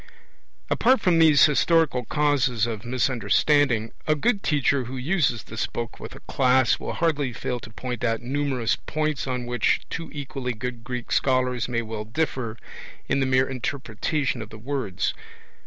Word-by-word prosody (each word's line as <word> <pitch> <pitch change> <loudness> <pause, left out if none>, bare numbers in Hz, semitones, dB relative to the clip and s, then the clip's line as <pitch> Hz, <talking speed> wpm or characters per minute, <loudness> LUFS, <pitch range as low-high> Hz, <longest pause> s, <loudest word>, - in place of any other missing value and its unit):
Apart 255 +3 +4
from 175 -3 +3
these 155 -3 +7
historical 150 -4 +2
causes 135 -6 +1
of 115 -3 -4
misunderstanding, 125 0 +2 0.2
a 155 - +3
good 205 +7 +1
teacher 140 -4 +1
who 130 +3 -6
uses 135 - 0
this 110 - -3
book 115 -1 -6
with - - -8
a - - -12
class 130 -1 +2
will - - -4
hardly 150 -6 0
fail 125 +1 -3
to 110 - -11
point 125 +1 -5
out 115 -2 +1
numerous 130 -2 0
points 155 -2 -2
on 125 -1 -2
which 120 0 +1
two 165 - -4
equally 135 -3 -4
good 120 0 -5
Greek 125 -1 -5
scholars 125 -2 +1
may 115 -1 -1
well 110 -1 -5
differ 115 -2 -2 0.5
in - - +1
the 135 - +1
mere 130 0 +3
interpretation 135 +2 -2
of 110 - -8
the 110 - -10
words. 120 -5 -2
130 Hz, 160 wpm, -25 LUFS, 120-145 Hz, 0.5 s, these